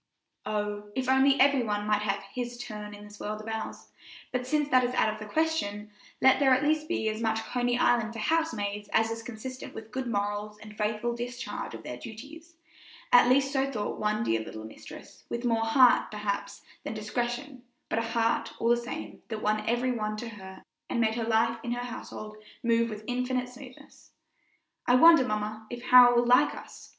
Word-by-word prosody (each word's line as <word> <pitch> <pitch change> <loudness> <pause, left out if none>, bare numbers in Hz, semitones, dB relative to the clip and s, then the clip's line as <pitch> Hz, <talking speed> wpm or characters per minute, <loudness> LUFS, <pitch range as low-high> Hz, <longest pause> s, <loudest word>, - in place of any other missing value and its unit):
Oh! 210 -1 -3
if 260 -1 -2
only 265 +1 +4
every 275 0 +5
one 210 -2 -2
might 210 0 +2
have 200 -1 -1
"his 240 -1 -4
turn" 210 -3 -7
in 205 - -12
this 210 0 -13
world 210 +1 -4
of 215 - -10
ours; 220 0 -5 0.4
but 250 -1 -2
since 300 0 +1
that 255 -1 +5
is 250 +1 -1
out 215 - +2
of 215 - -10
the 210 -1 -9
question, 215 -11 -1 0.3
let 265 0 +5
there 265 -2 +5
at 260 - 0
least 310 +1 +1
be 330 -10 -1
as 215 +1 -2
much 220 -1 0
Coney 245 +1 0
Island 235 -2 +2
for - - -8
housemaids 215 -7 -1
as 225 0 +3
is 225 0 -4
consistent 245 +3 -8
with 220 0 -9
good 260 +1 -3
morals 205 -1 -2
and 215 0 -12
faithful 215 +3 -1
discharge 240 - -5
of - - -10
their 125 - -6
duties; 295 - -11 0.6
at 245 0 +7
least 270 +2 +3
so 270 0 +1
thought 210 -5 -3
one 215 +1 0
dear 115 - +1
little 110 0 -8
mistress, 110 - -12
with 235 +1 -3
more 225 -2 +1
heart, 250 +2 +5
perhaps, 200 -1 -4 0.2
than 220 - -5
discretion, 240 +5 -3 0.3
but 225 - 0
a - - +1
heart, 230 0 0
all 230 - 0
the 240 - +5
same, 235 +1 -7
that 220 -2 -5
won 215 0 +1
every 245 +2 +1
one 215 -3 -2
to 235 +2 -5
her 190 -3 -11 0.3
and - - -1
made 220 -1 +2
life 230 0 +1
in 240 +1 -3
her 245 0 -4
household 215 -3 -8 0.3
move 230 0 +2
with 215 -1 -7
infinite 250 +1 -1
smoothness. 255 0 -14 0.7
"I 245 - +5
wonder, 325 +1 +8
mamma, 215 -1 -3
if 240 0 -7
Harold 250 -1 +8
will 240 0 +3
like 250 +1 +4
us?" - - -12
230 Hz, 200 wpm, -28 LUFS, 215-250 Hz, 0.7 s, wonder